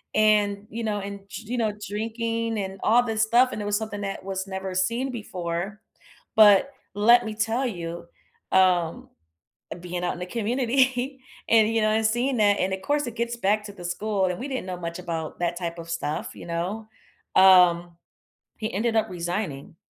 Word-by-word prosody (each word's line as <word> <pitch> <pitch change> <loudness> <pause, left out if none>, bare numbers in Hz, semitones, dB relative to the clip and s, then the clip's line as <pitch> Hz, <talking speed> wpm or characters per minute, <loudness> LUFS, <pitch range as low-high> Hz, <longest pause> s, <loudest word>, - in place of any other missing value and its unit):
and 210 -1 +3
you 230 +1 -5
know, 210 -1 -1
and 200 0 -6
d 220 - -7
you - - 0
know, 220 -3 0 0.2
drinking 230 +1 -2
and 190 -1 -5
all 240 +3 +5
this 225 -2 0
stuff, 240 +3 +4
and 215 - -4
it - - -4
was 205 0 +1
something 210 -2 -5
that 195 -2 -4
was 190 0 -3
never 190 0 -5
seen 235 +8 0
before, 190 -2 -4 0.5
but 215 +3 +7 0.2
let 235 +4 +5
me 220 -1 -4
tell 225 +4 0
you, 170 -5 -6 0.5
um, 180 -3 +2 0.7
being 180 0 -4
out 175 - 0
in - - -9
the 180 - -4
community 250 +4 0 0.3
and, 225 -1 +5
you 225 - +3
know, 215 - +3
and 220 +1 +1
seeing 240 +4 +1
that, 205 -2 +4
and 185 - 0
of 190 - -4
course 290 0 0
it 235 - -6
gets 235 +1 -1
back 210 -1 +1
to 205 - -8
the 180 -3 -11
school 200 +2 -1
and 180 - -3
we 260 - -4
didn't 260 -7 -3
know 180 -1 -4
much 170 -1 -5
about 165 -3 -5
that 175 0 -1
type 170 -1 -4
of 165 0 -9
stuff, 160 -2 -3
you - - -10
know, 180 +6 -3 0.5
um, 175 -2 +6 0.6
he 220 +1 -4
ended 225 +3 0
up 220 - +2
resigning. 175 -4 -4
205 Hz, 195 wpm, -25 LUFS, 180-225 Hz, 0.7 s, but